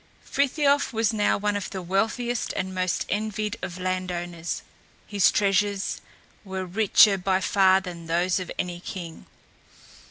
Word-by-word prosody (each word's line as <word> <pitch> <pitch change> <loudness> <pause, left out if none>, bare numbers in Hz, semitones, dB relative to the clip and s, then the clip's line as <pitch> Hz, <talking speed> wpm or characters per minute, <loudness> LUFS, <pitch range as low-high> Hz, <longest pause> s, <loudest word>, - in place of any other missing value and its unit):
Frithiof 280 +1 +2
was 225 0 +1
now 210 -1 +2
one 205 0 -1
of 205 - -3
the 190 - -5
wealthiest 225 +6 -1
and 190 -1 -3
most 185 -1 -1
envied 215 +1 -2
of 180 0 -5
land 185 0 -2
owners. 175 -1 -4 0.4
His 200 -3 +3
treasures 200 0 +1 0.4
were 190 -2 -4
richer 200 +1 +5
by 185 +1 +1
far 190 0 +4
than 170 -3 -8
those 175 +3 +1
of 185 - -6
any 175 -1 -3
king. 175 -2 -8
190 Hz, 145 wpm, -25 LUFS, 180-210 Hz, 0.4 s, richer